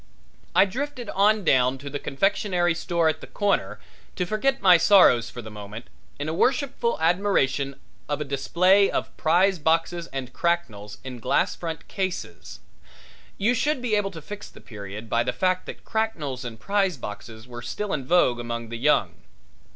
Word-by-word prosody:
I - - +7
drifted 255 +4 -5
on 210 +2 +3
down 130 -4 +3
to 140 +2 -10
the 145 0 -4
confectionery 175 +3 +1
store 170 0 0
at 155 0 0
the - - -9
corner 205 -1 -1 0.4
to 180 - -1
forget 265 +8 0
my 185 -2 +7
sorrows 160 - +5
for 120 0 -8
the 110 - -9
moment 105 +2 -9 0.3
in 145 - -4
a 160 - -2
worshipful 255 - +1
admiration 160 -6 +1 0.3
of 145 0 -1
a - - -1
display 185 +8 +3
of - - -3
prize 180 +3 +3
boxes 165 +2 0
and 130 -2 -6
cracknels 125 - -2
in 130 -2 -7
glass - - +1
front 165 -2 -6
cases 190 -2 -5 0.8
you 220 +5 +2
should 295 +3 0
be 245 -3 -2
able 205 -2 +2
to 165 -5 -10
fix 205 +4 -8
the - - -15
period 105 0 -9
by 115 +2 +1
the 125 +1 0
fact 185 0 0
that - - -9
cracknels 160 - -2
and 115 -3 -7
prize 195 - 0
boxes 110 +1 -9
were 120 -1 -8
still 200 - -4
in 135 - -2
vogue 130 -5 +3
among 115 -1 -5
the 115 - -5
young. 150 +5 +1
165 Hz, 175 wpm, -25 LUFS, 125-200 Hz, 0.8 s, I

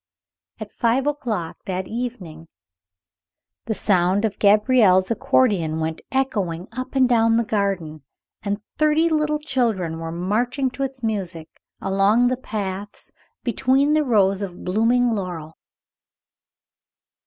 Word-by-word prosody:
At - - -8
five 245 +3 +1
o'clock 240 - -3
that 185 0 -3
evening 210 -10 -6 1.2
the 220 - -2
sound 190 +1 +2
of 210 -3 -3
Gabriel's 210 -2 +4
accordeon 210 - +1
went 160 0 -3
echoing 200 -10 -1
up 255 +3 -6
and 260 -1 +4
down 230 -2 +3
the 235 - +2
garden, 195 -8 -2 0.4
and 205 0 -3 0.2
thirty 305 +2 +3
little 305 -1 +1
children 225 - -1
were 165 0 -5
marching 240 - -1
to 265 - -8
its 265 -2 -4
music 185 -7 -3 0.3
along 200 +5 +2
the 255 - 0
paths, 205 -4 -5 0.3
between 265 +4 +2
the 310 0 +3
rows 200 -6 +2
of 185 -3 -7
blooming 230 +6 +2
laurel. 175 -7 -5
215 Hz, 120 wpm, -22 LUFS, 185-255 Hz, 1.2 s, Gabriel's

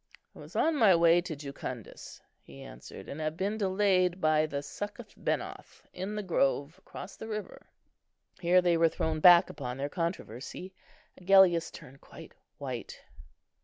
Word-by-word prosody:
"I - - -13
was - - -13
on 320 -1 +2
my 210 -8 +6
way 170 +1 +5
to 170 -2 -6
Jucundus," 140 -5 -8 0.2
he 70 -1 -13
answered, - - -11
"and 150 - -6
have 155 +1 -3
been 205 +4 -2
delayed 190 -2 +2
by 155 -2 +2
the 140 -1 -4
Succoth 205 +7 -7
benoth - - -4
in 190 +3 -5
the 210 - -3
grove 145 -3 0
across 195 - -10
the 220 - -9
river." 215 -1 -7 0.7
Here 180 +1 +4
they 175 -1 +3
were 165 0 +4
thrown 160 0 -2
back 175 +1 +8
upon 125 -2 -6
their 140 +1 -3
controversy. 170 - -5 0.5
Agellius 185 -3 +5
turned 135 +2 -13
quite - - -13 0.2
white. - - -6
170 Hz, 155 wpm, -30 LUFS, 145-190 Hz, 0.7 s, back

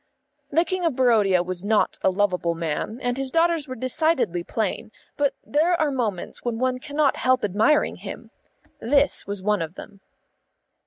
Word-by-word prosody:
The 330 +4 +2
King 370 +2 -2
of 325 -6 +1
Barodia 215 -8 +3
was 185 0 -5
not 215 +1 +1
a - - +3
lovable 180 -3 0
man, 165 +7 -3
and 245 0 0
his 270 -1 -2
daughters 330 -1 +1
were 255 - -6
decidedly 255 - 0
plain, 215 +2 -3 0.2
but 280 -2 0
there 335 +4 +1
are 305 -2 +1
moments 220 -9 -3
when 240 -2 -2
one 255 +1 0
cannot 290 0 0
help 255 -3 +2
admiring 215 +10 +2
him. - - -9 0.5
This 280 0 +2
was 200 -2 -5
one 210 -2 +1
of 165 +2 -5
them. 200 -1 -11
245 Hz, 165 wpm, -24 LUFS, 200-290 Hz, 0.5 s, Barodia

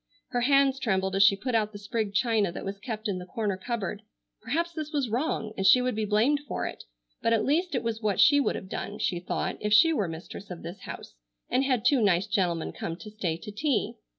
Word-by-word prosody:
Her 245 - -1
hands 275 +1 +4
trembled 190 -6 0
as 195 - +3
she 200 0 +7
put 250 +6 -4
out 215 -2 +1
the - - -7
sprigged 205 0 -3
china 220 -5 +2
that - - -6
was 195 +1 -5
kept 220 -1 -4
in 190 -3 -2
the 180 - -8
corner 210 -3 -2
cupboard. 205 0 -4 0.4
Perhaps 330 +10 -1
this 310 -2 -5
was 275 -7 -1
wrong, 230 -4 -1
and 195 - -2
she 250 - +8
would 250 0 0
be 215 0 -1
blamed 220 +8 +3
for - - -3
it, - - -7 0.4
but 230 - +2
at 220 -1 +2
least 335 +3 +1
it 250 - -1
was 230 -1 -2
what 210 -3 0
she 285 -1 +7
would 280 - +1
have 190 - -6
done, 205 +2 -5
she 175 - -1
thought, 175 - -3
if 210 - -2
she 325 +10 +7
were 205 - 0
mistress 165 +4 -8
of 180 -2 -8
this 175 +4 -7
house - - -8 0.4
and 265 +2 +2
had 255 -4 0
two 260 -1 +4
nice 190 -3 +3
gentlemen 180 -6 0
come 165 - -5
to 210 +4 -11
stay 180 -6 -2
to 210 - -9
tea. 265 +3 -1
215 Hz, 240 wpm, -28 LUFS, 195-255 Hz, 0.4 s, she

